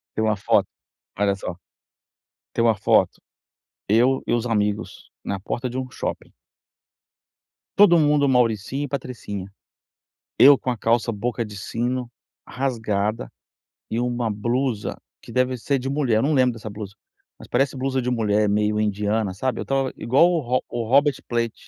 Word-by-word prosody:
Tem 110 - 0
uma 110 -1 +2
foto 100 - +2 0.5
olha 100 -1 +2
só, 95 -2 -6 1.0
tem 115 - +1
uma 115 -2 +4
foto, 100 - +2 0.7
eu 125 +5 +3
e - - 0
os 120 0 0
amigos 105 -2 -2
na 100 - -2
porta 120 +5 -3
de 125 - -4
um 130 0 -3
shopping - - -5 1.4
todo 195 -4 +7
mundo 145 -2 +3
mauricinho 125 +1 +1
e 145 - -4
patricinha. 105 -8 -5 0.9
Eu 140 +1 +9
com 130 - -3
a 125 - -2
calça 115 +2 +1
boca 115 +2 -2
de 105 -1 -9
sino 120 +4 -2 0.4
rasgada 110 - -2 0.6
e 115 - -1
uma 120 -1 -1
blusa, 120 +1 -2 0.2
que - - -12
deve 125 0 +1
ser 135 +3 -1
de 135 +2 -4
mulher. 130 -6 +1
Não 150 +4 +1
lembro 130 -2 +3
dessa 110 -1 -8
blusa, 100 -1 -8 0.5
mas - - -12
parece 135 +3 +1
blusa 130 0 -1
de 125 - -2
mulher, 105 -3 +1
meio 105 +1 +1
indiana, 105 -1 0
sabe? 130 +7 -2
Eu - - -2
estava 135 -1 0
igual 135 +9 +4
o 170 - +1
Ro 125 0 0
o 120 -1 -3
Robert 140 +3 +4
Plant. 115 -2 -1
120 Hz, 160 wpm, -23 LUFS, 105-130 Hz, 1.4 s, Eu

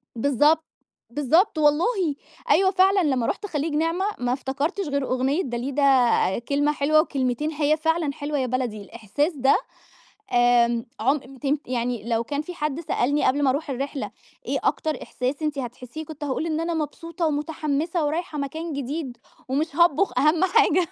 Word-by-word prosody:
بالضبط. 295 +6 +3 0.4
بالضبط 315 - +2
والله، 295 +2 +3 0.7
أيوه 380 0 +5
فعلًا، 380 0 +4
لمّا 260 -6 +1
رُحت 410 - -2
خليج 305 -3 -2
نعمة 330 +5 0
ما 245 0 0
افتكرتش 285 +8 -2
غير 280 -1 -1
أغنية 265 +7 +1
داليدا، 255 -4 +2
كلمة 285 +4 +1
حلوة 305 +2 +3
وكلمتين، 270 +2 -1
هي 305 0 +1
فعلًا 320 -2 0
حلوة 290 0 -3
يا 260 - 0
بلدي، 240 -4 -2
الإحساس 235 - -2
ده 270 0 +4 0.8
آمم، 240 -1 +3
عُم 270 +2 -1
تن 285 +2 0
يعني 240 -2 -2
لو 230 0 +1
كان 285 +3 -3
في 355 +4 -8
حد 300 -1 -2
سألني 290 -2 0
قبْل 285 +2 +2
ما 265 - +4
أرُوح 285 +3 -1
الرحلة، 275 +2 -3 0.3
إيه - - -1
أكتر 310 -1 -1
إحساس 255 +5 -3
أنت 300 -2 -1
هتحسّيه، 250 +5 -7
كنت 305 -1 -8
هاقول 290 +3 -2
إن 315 -1 -1
أنا 335 +1 -1
مبسوطة 330 +2 -3
ومتحمّسة 305 +1 -1
ورايحة 310 0 -2
مكان 315 +3 -4
جديد 275 -1 -4 0.3
ومش 295 +5 -1
هاطبُخ 340 -3 +3
أهم 310 +5 +3
حاجة 365 -4 +3
290 Hz, 160 wpm, -24 LUFS, 260-315 Hz, 0.8 s, أيوه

